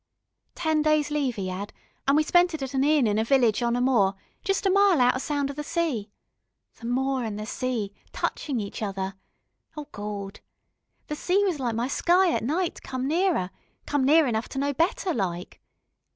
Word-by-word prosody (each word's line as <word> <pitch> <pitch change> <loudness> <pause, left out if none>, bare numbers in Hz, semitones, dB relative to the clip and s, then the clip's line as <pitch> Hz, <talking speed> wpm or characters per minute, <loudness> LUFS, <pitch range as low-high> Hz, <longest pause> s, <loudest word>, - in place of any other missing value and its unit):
Ten 315 -3 +1
days 305 -1 +2
leave 280 -6 -1
'e 190 -2 -3
'ad, 200 +3 -5 0.4
an' 275 - +5
we 310 - +4
spent 350 +1 +3
it 290 - -5
at 265 0 -5
an 265 0 +2
inn 295 -2 +4
in 210 0 +1
a - - +2
village 240 -3 +3
on 235 0 +1
a 245 - 0
moor, 215 -7 +3 0.3
jest 390 +1 0
a 385 - +4
mile 395 -4 +5
out 245 0 +5
o' 255 - -2
sound 285 0 -1
of - - -10
the 295 - -4
sea. 290 - -1 0.7
The 230 - -6
moor 265 +1 0
an' 220 -2 -3
the 210 +1 -5
sea, 220 -3 -3 0.2
touchin' 275 -6 -2
each 200 0 -6
other.... 195 -2 -3 0.6
Oh 300 - -5
Gawd!... 205 -1 -6 0.7
The 300 - -4
sea 370 +6 +1
was 355 -7 -1
like 240 -4 -1
my 235 +2 0
sky 350 +6 +3
at - - -1
night 330 +8 -1
come 260 0 -4
nearer 330 - +1 0.3
come 290 -2 0
near 305 +4 +5
enough 225 -3 -1
to - - -7
know 285 +1 0
better, 340 +5 0
like. 180 -4 -4
265 Hz, 200 wpm, -26 LUFS, 220-310 Hz, 0.7 s, an